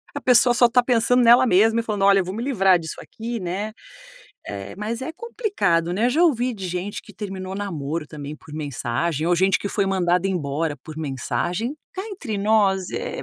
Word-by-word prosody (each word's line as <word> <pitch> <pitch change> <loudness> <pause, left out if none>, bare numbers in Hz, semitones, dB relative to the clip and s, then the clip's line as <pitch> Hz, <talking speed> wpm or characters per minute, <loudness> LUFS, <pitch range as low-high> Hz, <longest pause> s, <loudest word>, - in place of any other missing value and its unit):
A - - -4
pessoa 245 -1 +5
só 240 -1 +6
tá 245 +1 +3
pensando 245 0 +3
nela 240 +2 +7
mesma 225 +2 +4
e - - -1
falando: 210 -3 -3
"Olha, 195 0 +6
eu 185 - 0
vou 185 - -5
me 225 - -4
livrar 195 -9 +3
disso 160 -1 -7
aqui", 230 +1 -6
né, 195 +4 -3 0.8
eh, 100 - -7
mas 220 +4 -4
é 305 - -4
complicado, 325 - -1
né. 225 +5 +2
Eu - - +2
já 320 +7 +2
ouvi 255 -6 +2
de 190 -3 -5
gente 180 +3 -4
que - - -15
terminou 190 -2 -6
namoro, 165 -6 -4
também, 150 -1 -8
por 160 -2 -15
mensagem 150 +2 -2
ou 175 - +3
gente 190 +2 +3
que - - -5
foi 200 -1 0
mandada 180 0 +1
embora 150 -3 -2
por 155 +3 -11
mensagem. 160 - -2 0.2
Cá 380 - -4
entre 275 - -5
nós, 200 -3 +2
eh, 485 +1 -4
195 Hz, 205 wpm, -23 LUFS, 170-235 Hz, 0.8 s, nela